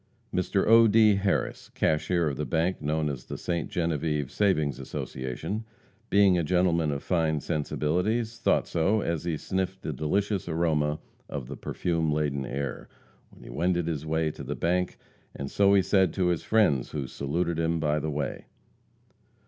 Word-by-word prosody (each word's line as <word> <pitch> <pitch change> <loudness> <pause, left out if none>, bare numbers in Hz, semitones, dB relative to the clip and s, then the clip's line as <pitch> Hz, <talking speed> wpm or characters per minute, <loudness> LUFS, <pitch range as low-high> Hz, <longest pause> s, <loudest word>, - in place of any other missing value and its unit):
Mr. 95 +1 +1
O. 115 +1 +7
D. 110 -1 +6
Harris, 100 0 -1
cashier 85 +2 +1
of 70 - -1
the 75 - -3
bank 85 +4 0
known 75 +1 0
as 70 -4 -4
the - - -6
Ste. 85 -2 -2
Genevieve 75 -4 -1
Savings 80 -9 +1
Association, 65 - -4 0.5
being 100 -3 +5
a - - 0
gentleman 85 -1 +2
of 70 -1 -3
fine 80 -4 +1
sensibilities, 90 - -1
thought - - +2
so 95 +6 +1
as 85 -2 -2
he 85 -3 -1
sniffed 95 +3 -3
the 80 - -3
delicious 95 - -1
aroma 80 -2 +1 0.3
of 70 -5 -5
the 70 - -6
perfume 80 0 -1
laden 70 -3 -1
air, 70 -1 -4 0.4
when - - -17
he - - -11
wended 85 +4 0
his 80 -3 -2
way 80 0 0
to - - -10
the - - -4
bank, 90 +1 0 0.4
and 70 0 -5
so 100 0 +4
he 95 - +4
said 95 -4 +3
to 90 -2 +1
his 85 -2 0
friends 95 - +2
who 70 -3 -2
saluted 80 +6 -2
him 80 0 +1
by 75 -1 +1
the 80 +1 -3
way. 75 -1 -3
80 Hz, 170 wpm, -27 LUFS, 75-95 Hz, 0.5 s, O